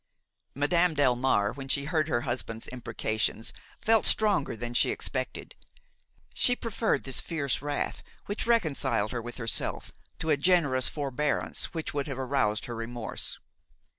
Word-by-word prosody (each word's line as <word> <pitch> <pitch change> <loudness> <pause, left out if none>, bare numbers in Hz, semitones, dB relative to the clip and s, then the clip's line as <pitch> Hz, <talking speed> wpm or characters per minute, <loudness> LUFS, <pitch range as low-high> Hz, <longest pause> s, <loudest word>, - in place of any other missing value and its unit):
Madame 165 +4 +2
Delmare, 125 -6 +2
when 135 -1 -7
she 140 +1 +2
heard 155 -1 +1
her 120 -6 +1
husband's 120 -3 -3
imprecations, 115 -2 -2 0.3
felt 225 -1 +4
stronger 200 - +3
than 120 +1 -5
she - - +3
expected. - - -3 0.8
She 245 - +4
preferred 225 - -1
this 135 -2 0
fierce 145 -7 -1
wrath, 145 0 -2 0.2
which 205 +2 -3
reconciled 160 - +1
her 120 - -3
with 120 +1 -7
herself, 115 -2 -1 0.3
to 160 - -1
a 145 - +4
generous 145 -5 +3
forbearance 145 0 -1
which 160 -1 -3
would 145 0 -2
have 135 -3 -4
aroused 130 -5 0
her 120 -3 -5
remorse. 115 0 -3
140 Hz, 140 wpm, -28 LUFS, 120-160 Hz, 0.8 s, felt